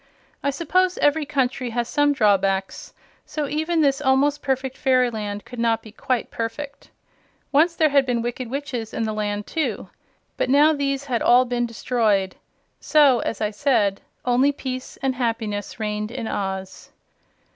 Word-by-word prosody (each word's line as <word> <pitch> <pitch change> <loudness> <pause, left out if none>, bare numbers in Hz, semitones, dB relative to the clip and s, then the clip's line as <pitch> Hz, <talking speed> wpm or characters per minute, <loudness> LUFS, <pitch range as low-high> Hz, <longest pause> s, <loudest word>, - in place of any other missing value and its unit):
I 280 - 0
suppose 360 +5 +1
every 295 0 +2
country 260 -3 -1
has 235 0 -2
some 290 +2 +2
drawbacks, 195 -6 +1 0.3
so 300 -2 -4
even 315 +3 0
this 275 -1 +2
almost 280 +2 +2
perfect 265 -1 -2
fairyland 230 -7 0
could 245 - -9
not 230 -1 +1
be 220 - -12
quite 255 +1 -2
perfect. 280 +5 -5 0.6
Once 325 +4 +4
there 315 -2 +3
had 280 -1 +4
been 240 -2 0
wicked 240 0 -4
witches 255 -5 -4
in 230 - -1
the 220 -1 -2
land, 210 -1 -2
too; 320 -2 -3 0.5
but - - 0
now 295 +4 +5
these 275 -1 -1
had 245 -4 -1
all 250 +1 +5
been 240 -1 -1
destroyed; 215 -5 0 0.4
so, 285 -5 +4
as 225 - -3
I 210 -1 0
said, 210 -4 +1 0.2
only 250 +3 +3
peace 255 -2 -6
and 265 -1 +1
happiness 225 -4 -3
reigned 210 0 -2
in 235 -1 -5
Oz. 190 -2 -4
250 Hz, 155 wpm, -23 LUFS, 220-280 Hz, 0.6 s, now